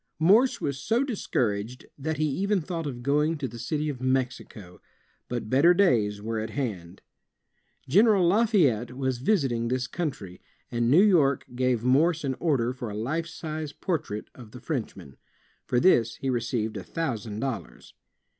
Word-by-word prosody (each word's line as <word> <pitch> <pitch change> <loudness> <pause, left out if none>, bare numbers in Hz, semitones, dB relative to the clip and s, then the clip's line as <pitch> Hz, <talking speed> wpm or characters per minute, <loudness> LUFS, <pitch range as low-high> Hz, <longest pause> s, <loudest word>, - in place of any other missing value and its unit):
Morse 210 +11 +4
was 140 -1 -3
so 225 - +1
discouraged 125 - -2
that 155 +2 -3
he 155 - +1
even 195 +8 0
thought 165 -1 -4
of 120 -3 -6
going 150 +4 +1
to 140 -2 -3
the 120 0 -10
dty 150 +6 -2
of 135 -4 -4
Mexico. 130 -7 -3 0.5
But 120 -3 -3
better 145 +9 +5
days 110 - +2
were 115 0 -2
at 110 +1 -4
hand. 100 -9 -5 0.8
General 195 - +4
Xafayette 170 - +2
was 130 -2 -1
visiting 130 - +1
this 130 +1 -1
country, 130 - -5 0.3
and 120 0 0
New 165 +9 +6
York 155 -10 +3
gave 125 -2 0
Morse 150 +6 +3
an 135 -2 -1
order 130 -7 +1
for 125 -3 -6
a 105 - -6
life 155 +9 -2
size 155 -2 -6
portrait 145 - -3
of 115 -4 -13
the 125 - -9
Frenchman. 120 - -5 0.5
For 125 - +2
this 115 -9 +3
he 135 - -2
received 115 -2 -2
a - - -6
thousand 115 -10 -4
dollars. 130 -4 -5
130 Hz, 160 wpm, -26 LUFS, 115-160 Hz, 0.8 s, New